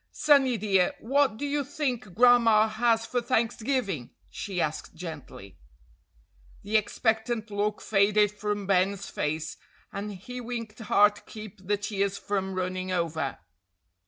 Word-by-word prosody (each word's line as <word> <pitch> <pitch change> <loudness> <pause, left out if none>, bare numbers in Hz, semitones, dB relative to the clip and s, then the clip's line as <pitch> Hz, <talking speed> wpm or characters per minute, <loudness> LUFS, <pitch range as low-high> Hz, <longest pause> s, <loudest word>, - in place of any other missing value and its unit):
"Sonny, 275 -5 +4
dear, 195 +3 +2
what 270 -2 +2
do 290 - -3
you 285 0 0
think 250 - -3
Gran'ma 230 -3 +6
has 225 +1 +1
for 245 +1 -1
Thanksgiving?" 230 - -1 0.2
she 195 -3 -4
asked 155 +1 -2
gently. 155 - -9 1.0
The 205 +2 -3
expectant 220 +1 0
look 205 +1 -1
faded 205 0 +3
from 210 -1 -3
Ben's 195 +1 +1
face, 155 +1 -3 0.4
and 205 +1 -4
he 250 +7 -8
winked 230 -2 -6
hard 210 -1 +4
to - - -13
keep 210 -3 -11
the 205 0 +2
tears 200 -1 -1
from 190 -2 -2
running 185 0 -2
over. 160 -6 -1
210 Hz, 130 wpm, -27 LUFS, 190-235 Hz, 1.0 s, Gran'ma